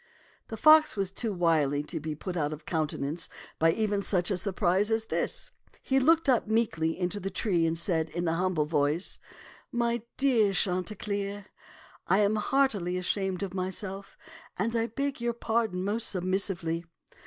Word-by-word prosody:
The 225 - -6
fox 310 +5 +6
was 195 -2 -1
too 220 +3 -3
wily 155 -6 +1
to - - -5
be 155 0 -4
put 180 +4 -6
out 150 -3 -1
of 150 0 -10
countenance 155 -1 -2 0.3
by 165 0 +5
even 210 0 0
such 180 -2 +1
a - - +2
surprise 190 +1 +1
as 225 0 0
this. - - -1 0.3
He 270 0 +2
looked 325 +4 +4
up 250 -4 +3
meekly 165 -8 0
into 185 +3 -1
the 195 0 -3
tree 180 -4 +1
and 165 0 -1
said 165 -2 +1
in 175 +2 -3
a 165 - +1
humble 175 -3 0
voice, 150 +3 0 0.5
"My 235 -1 0 0.2
dear 235 -7 +3
Chanticleer, 200 +2 -1 0.6
I 195 - +4
am 210 +1 +2
heartily 210 -7 +1
ashamed 190 +1 -1
of 190 -2 -4
myself, 190 +1 -4 0.4
and 230 +5 -1
I 230 0 +1
beg 275 +2 -3
your 235 0 0
pardon 225 -5 -1
most 215 +4 0
submissively. 180 -3 -1
195 Hz, 165 wpm, -28 LUFS, 170-220 Hz, 0.6 s, fox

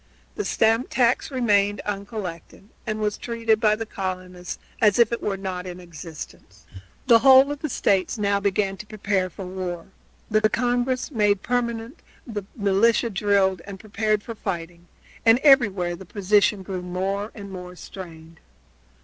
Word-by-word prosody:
The 420 - -4
stamp 225 +3 +2
tax 245 -1 +2
remained 205 -6 +2
uncollected 200 -2 -6 0.2
and 215 -1 -2
was 210 -1 -1
treated 230 -2 0
by 215 -1 +3
the 225 +1 -5
colonists 185 -3 -5 0.2
as 210 -3 +5
if 235 -1 +4
it 235 - -2
were 200 -2 -2
not 185 -2 -5
in 180 0 -7
existence. 165 -2 -11 0.4
The 235 -3 +7
whole 265 +2 +7
of 290 - -4
the 305 - -3
States 195 -2 +1
now 200 -1 +1
began 195 -1 0
to 210 - -10
prepare 200 -3 -1
for 185 +2 -8
war. 180 -2 -5 0.4
The 215 -1 +2
Congress 245 +4 0
was 245 - -9
made 205 -2 +2
permanent, 235 0 -2 0.3
the 210 -5 -5
militia 225 +3 +2
drilled 195 -2 +2
and 195 -1 -8
prepared 215 0 -1
for 230 - -6
fighting, 175 -4 -6 0.4
and 225 0 +6
everywhere 205 - +4
the 190 +2 -11
position 200 +1 +2
grew 185 -1 -5
more 190 +4 -3
and 200 -3 -9
more 180 -1 -8
strained. 165 -3 -11
205 Hz, 160 wpm, -24 LUFS, 185-225 Hz, 0.4 s, The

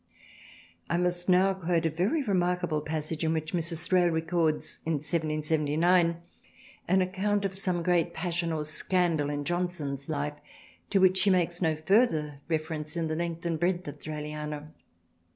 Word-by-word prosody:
I 170 - +1
must 175 0 0
now 185 +2 +5
quote 175 -2 0
a 165 - +2
very 195 - 0
remarkable 180 - 0
passage 155 +1 -3
in 160 0 +2
which 155 +1 -3
Mrs. 170 -1 -2
Thrale 180 -2 +4
records 160 -1 0
in 165 - -1
1779 160 +2 +1 0.7
an 190 +2 +4
account 200 +2 0
of 195 - -2
some 185 -3 -1
great 175 -1 +2
passion 170 0 -1
or 155 -1 -2
scandal 160 -1 +1
in 145 0 -3
Johnson's 160 -5 -2
Life 150 -1 -2 0.5
to 200 - +2
which 185 0 +5
she 195 +2 +4
makes 175 -1 +1
no 160 -2 +2
further 155 - +2
reference 155 0 -3
in 165 -1 -1
the 155 - -1
length 170 0 -3
and 165 -2 -1
breadth 175 +1 0
of 145 - -7
Thraliana. 150 0 -5
170 Hz, 155 wpm, -28 LUFS, 155-180 Hz, 0.7 s, now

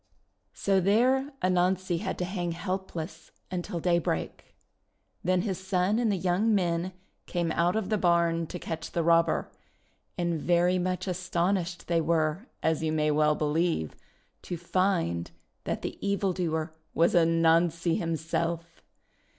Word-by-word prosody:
So 195 -1 +2
there 255 +8 +3
Anansi 185 -1 +1
had - - -3
to 180 - -1
hang 175 -2 -3
helpless 185 -2 -5 0.2
until 175 -1 -3
daybreak. 170 0 -1 0.7
Then 180 0 +2
his 190 -5 -2
son 190 +3 +1
and 230 -3 +2
the - - +1
young 190 +5 +2
men 175 -1 0 0.3
came 170 -2 -1
out 170 +3 +2
of 220 -3 -1
the 215 -2 +1
barn 170 -2 +2
to 180 - -6
catch 165 -2 -6
the 170 - +1
robber, 165 0 +3 0.7
and 170 -3 -1
very 175 +2 +3
much 185 0 -1
astonished 180 0 -1
they 170 -1 +2
were, 160 +5 0 0.2
as 160 -1 +1
you 160 -1 0
may 155 -1 +1
well 150 0 +3
believe, 155 - 0 0.5
to 175 - -5
find 170 - 0 0.4
that - - -3
the - - -5
evil 200 -1 +1
doer 160 -3 -2 0.2
was 170 +1 +4
Anansi 165 0 +3
himself 165 +1 -2
175 Hz, 140 wpm, -28 LUFS, 165-185 Hz, 0.7 s, was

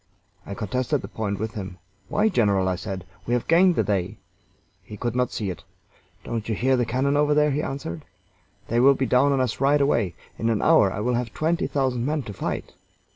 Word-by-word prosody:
I 100 - -5
contested 125 +7 -1
the - - -5
point 100 -2 -3
with 110 +2 -4
him. 95 -5 -6 0.3
"Why, 210 - +2
general," 100 - +2
I 95 - +1
said, 95 0 -6 0.2
"we 120 - +2
have 125 - -2
gained 175 +2 +5
the 110 - +2
day." 95 -3 -1 0.6
He 105 - -10
could 120 +2 -3
not 125 0 +1
see 100 -4 -3
it. 90 - -10 0.6
"Don't 115 -1 -4
you 110 - 0
hear 130 +4 +2
the 120 -2 0
cannon 135 +4 +1
over 150 0 +3
there?" 150 0 +3
he 145 +2 0
answered. 130 - -5 0.6
"They 115 - +1
will 135 +2 +6
be 130 - 0
down 130 +4 +3
on 135 - +1
us 125 -1 -1
right 140 +2 +4
away! 115 -10 +1 0.2
In 115 - 0
an 110 -2 0
hour 155 -12 +5
I 100 - -4
will 125 +3 0
have 120 -1 -2
twenty 165 +2 0
thousand 130 -4 0
men 150 +2 -1
to 105 - -7
fight." - - -4
120 Hz, 220 wpm, -24 LUFS, 105-140 Hz, 0.6 s, will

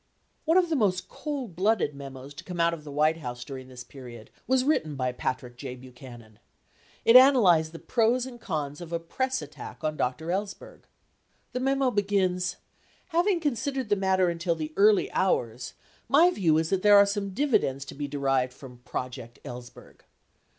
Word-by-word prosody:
One 325 +3 +4
of 360 -2 +3
the 320 - +1
most 195 -8 0
cold 270 - -5
blooded 195 -5 +1
memos 135 0 -9
to - - -10
come 180 -2 -7
out 170 0 +3
of 160 -2 -7
the 150 - -9
White 155 +3 +2
House 125 -5 -6
during 130 -2 -8
this 125 -1 -10
period 120 -5 -12 0.2
was 260 0 +3
written 160 - 0
by 130 -1 -1
Patrick 125 -1 -4
J. 130 -1 -6
Buchanan. 125 -3 -13 0.7
It 230 - +6
analyzed 210 - +6
the 165 - -9
pros 240 +5 +1
and 245 -3 -10
cons 150 -2 -4
of 170 -1 -9
a 170 - 0
press 260 +10 -2
attack 145 -2 -10
on 155 0 -1
Dr. 145 +6 -2
Ellsberg. 195 +2 -5 0.7
The 250 - -3
memo 270 0 +1
begins, 190 -4 0 0.5
"having 350 +2 +2
considered 270 -4 -2
the 205 - +4
matter 190 -1 +2
until 170 0 -1
the 155 -1 -5
early 205 0 +4
hours, 120 -10 -1 0.3
my 330 +6 +6
view 165 - +2
is 160 0 -1
that 190 -1 +1
there 205 0 +7
are 200 - +7
some 200 0 -2
dividends 195 - 0
to - - -9
be 145 0 -4
derived 135 -3 0
from 125 -2 -13
"Project 125 -1 -6
Ellsberg." 120 0 -11
170 Hz, 180 wpm, -27 LUFS, 135-225 Hz, 0.7 s, there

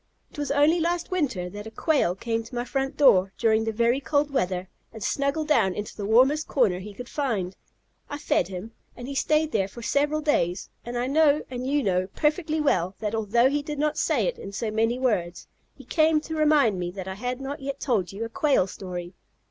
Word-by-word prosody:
It - - -10
was 290 - -2
only 295 +4 +4
last 345 +2 -1
winter 265 - -1
that 205 +2 -8
a - - -6
Quail 250 - +1
came 225 +3 -2
to 230 +2 -11
my 240 0 -2
front 270 +1 -2
door, 195 -9 +5
during 220 -1 +2
the 225 - 0
very 235 +4 +2
cold 290 +1 +1
weather, 185 -8 -1 0.2
and 220 -2 -8
snuggled 280 +6 -1
down 210 -11 +3
into 210 0 -5
the 200 -2 -4
warmest 265 +8 +4
corner 215 -10 +2
he 205 +3 -8
could 245 +2 -8
find. 215 -12 -2 0.5
I 290 - -4
fed 295 +1 +1
him, 190 +4 -7 0.3
and 245 - -7
he 280 - -5
stayed 310 +3 +1
there 195 -6 +1
for 235 +4 -11
several 295 +4 +1
days, 180 - 0
and 240 +1 -5
I 240 - 0
know, 300 +2 +3
and 250 0 -4
you 285 +1 +1
know, 185 -2 +1
perfectly 310 +1 0
well 185 - +1
that 210 -1 -3
although 225 +3 +3
he 290 +1 0
did 295 0 -6
not 300 +1 0
say - - +1
it - - -2
in 195 - -7
so 215 +1 -2
many 225 +3 +1
words, 185 -9 -1 0.3
he 270 - -14
came 310 +3 +3
to 320 +1 -6
remind 295 -10 +3
me 175 -1 -2
that 190 +1 -7
I 190 - -3
had 245 +5 -4
not 275 +3 -5
yet 275 0 -5
told 210 -10 0
you 210 +4 -4
a - - -6
Quail 295 - +2
story. 180 -2 -7
245 Hz, 220 wpm, -25 LUFS, 205-295 Hz, 0.5 s, door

